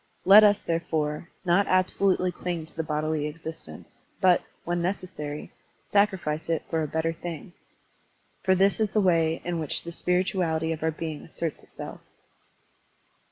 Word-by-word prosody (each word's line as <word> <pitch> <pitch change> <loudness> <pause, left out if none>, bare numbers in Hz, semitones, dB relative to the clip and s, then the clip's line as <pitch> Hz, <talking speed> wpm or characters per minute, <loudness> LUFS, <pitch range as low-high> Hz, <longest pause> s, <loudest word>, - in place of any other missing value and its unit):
Let 205 +3 +10
us, 205 -1 +4
therefore, 160 -2 -2 0.2
not 180 +3 +3
absolutely 185 0 +2
cUng 175 -2 -4
to 160 - -16
the - - -1
bodily 155 -1 -1
existence, 155 - -9 0.2
but, 180 -2 +5 0.2
when 175 0 -1
necessary, 175 -5 -4 0.4
sacrifice 190 -7 +1
it 165 -2 0
for 160 - +1
a 155 - -1
better 160 +2 -1
thing. 170 0 -7 0.9
For 190 - +3
this 195 +3 +3
is 215 -1 +2
the 215 - +1
way 165 -4 +2
in 175 -1 -1
which 155 -3 0
the 170 - -6
spirituality 175 -2 0
of 160 - -4
our 160 - +1
being 160 -1 -5
asserts 165 -1 -5
itself. - - -9
165 Hz, 150 wpm, -27 LUFS, 160-185 Hz, 0.9 s, Let